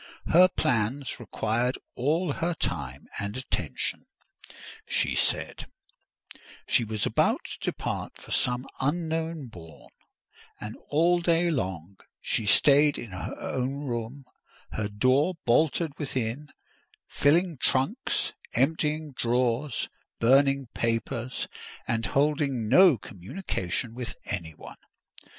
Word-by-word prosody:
Her 180 +3 +9
plans 125 - -1
required 120 +2 -1 0.2
all 150 +5 0
her 170 +3 -1
time 65 - -3
and 100 +3 -3
attention, 85 - -2 0.8
she - - +2
said; - - 0 1.0
she - - +3
was 110 -2 -2
about - - +1
to - - -7
depart - - -3
for - - -13
some 125 +1 +1
unknown 160 -1 -1
bourne; 80 -6 -13 0.7
and 105 0 -6
all 170 +4 +3
day 170 0 +3
long 95 - -3 0.2
she 110 - -1
stayed 145 +6 +5
in 115 -4 -7
her 90 - -5
own 135 +3 -2
room, 120 +2 -4 0.5
her 110 -1 -2
door 130 - +2
bolted 155 +6 +3
within, 135 0 -3 0.6
filling 165 +3 +2
trunks, 185 - +1 0.2
emptying 150 +3 +1
drawers, 120 +3 0 0.3
burning 135 +3 +4
papers, 115 +1 -2 0.4
and 115 -1 0
holding 140 -3 +1
no 180 - +7
communication 105 - -4
with 120 -1 -5
any 85 -6 -4
one. - - -11
130 Hz, 110 wpm, -27 LUFS, 110-150 Hz, 1.0 s, Her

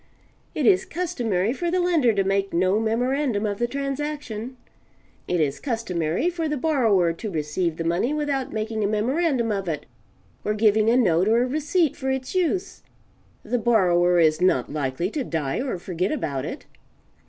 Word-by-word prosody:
It - - 0
is 385 -1 +5
customary 240 - -1
for 345 +5 -2
the 365 +2 +1
lender 335 -9 +3
to 200 -2 +1
make 195 0 0
no 185 +4 +2
memorandum 235 0 0
of 205 -1 -2
the 240 - +1
transaction. 275 -3 -4 0.7
It 180 - 0
is 145 -3 0
customary, 220 - -1
for 335 -3 -1
the 300 - -1
borrower 225 - +2
to 210 +6 -6
receive 160 0 -2
the 165 - -2
money 170 - 0
without 290 -3 -1
making 220 0 -2
a - - +2
memorandum 240 +3 0
of 195 -2 -2
it, 155 - -3 0.6
or 210 - -1
giving 215 0 +3
a 240 - +4
note 185 -6 +3
or 230 +2 +4
a - - -1
receipt 305 +3 +1
for 265 - -3
it's 265 -1 -2
use 370 +1 -1 0.6
the 245 - -1
borrower 180 -6 +3
is 155 -1 +3
not 145 -8 +2
likely 150 +5 -2
to 295 - -2
die 160 - -2
or 260 -8 -2
forget 180 +1 -2
about 140 - -2
it. - - -7
225 Hz, 175 wpm, -24 LUFS, 180-275 Hz, 0.7 s, is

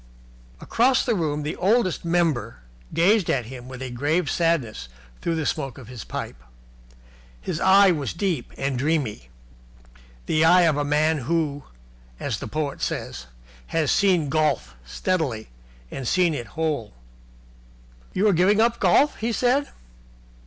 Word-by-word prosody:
Across 255 +3 +2
the 240 - +1
room 150 -6 -1
the 150 - -3
Oldest 200 0 +1
Member 160 - 0 0.3
gazed 195 +3 +3
at 125 -4 0
him 125 +1 -9
with 130 0 -8
a 130 - -5
grave 145 +5 0
sadness 140 - 0 0.3
through 165 - -1
the 160 -2 -2
smoke 135 -5 -3
of 125 -4 -12
his 125 -3 -8
pipe. - - -6 1.0
His 110 - -4
eye 195 0 +6
was 145 -7 -2
deep 170 - -2
and 135 -2 -2
dreamy 135 - -1 1.0
the 155 0 +2
eye 175 +2 +6
of 160 -3 +3
a 145 - 0
man 150 +2 +1
who, 145 +1 -1 0.5
as - - -3
the - - -6
poet 150 -2 -3
says, - - -4 0.4
has 160 -3 0
seen 180 -6 +3
Golf 145 - 0
steadily 125 - -2 0.4
and 130 -3 -5
seen 180 +1 +2
it 120 -6 -5
whole. 150 -9 -2 1.2
"You 205 +3 +1
are 205 - +4
giving 185 +5 +3
up 235 +1 +2
golf?" 290 +2 +3
he 230 +2 -2
said. 255 +5 +1
155 Hz, 145 wpm, -24 LUFS, 130-180 Hz, 1.2 s, eye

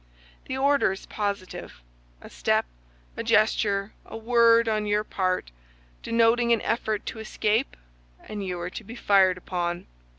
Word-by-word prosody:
The 260 - -4
order 280 -4 +3
is 190 - -10
positive. 200 - -5 0.4
A - - -11
step, - - +1 0.5
a - - -4
gesture, 205 -1 +2
a - - -9
word, 230 0 +4
on 215 -1 0
your 210 +1 +1
part, 185 - -2 0.5
denoting 235 +1 +2
an 230 - +3
effort 220 -2 -1
to 225 - -6
escape, 220 +3 -1 0.5
and 210 -1 -5
you 180 -2 -4
are 175 +1 -5
to - - -7
be 225 +4 -10
fired 195 -5 +3
upon. 175 -1 -3
210 Hz, 145 wpm, -26 LUFS, 190-230 Hz, 0.5 s, word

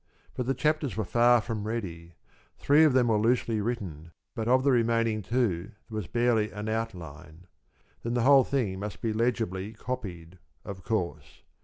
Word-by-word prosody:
But 125 - -3
the 135 - +1
chapters 150 - 0
were 110 - 0
far 120 +3 +4
from 110 -2 -4
ready. 85 -7 -5 0.4
Three 145 +3 +4
of 150 - +4
them 125 -2 +3
were 110 -2 +3
loosely 115 -1 +1
written, 95 -9 -4 0.3
but 115 -2 -3
of 130 +1 +4
the 140 - +4
remaining 115 -2 +2
two 105 -3 -1 0.2
there - - -6
was 105 -5 -3
barely 120 -3 +1
an 105 +1 -6
outline. 90 -7 -5 0.6
Then 120 +3 -2
the 120 - +1
whole 135 0 +7
thing 115 -10 -1
must 100 -1 -6
be 110 -2 0
legibly 110 -3 -1
copied, 95 -8 -6 0.3
of 95 -3 -8
course. 100 -6 -3
110 Hz, 170 wpm, -28 LUFS, 95-120 Hz, 0.6 s, whole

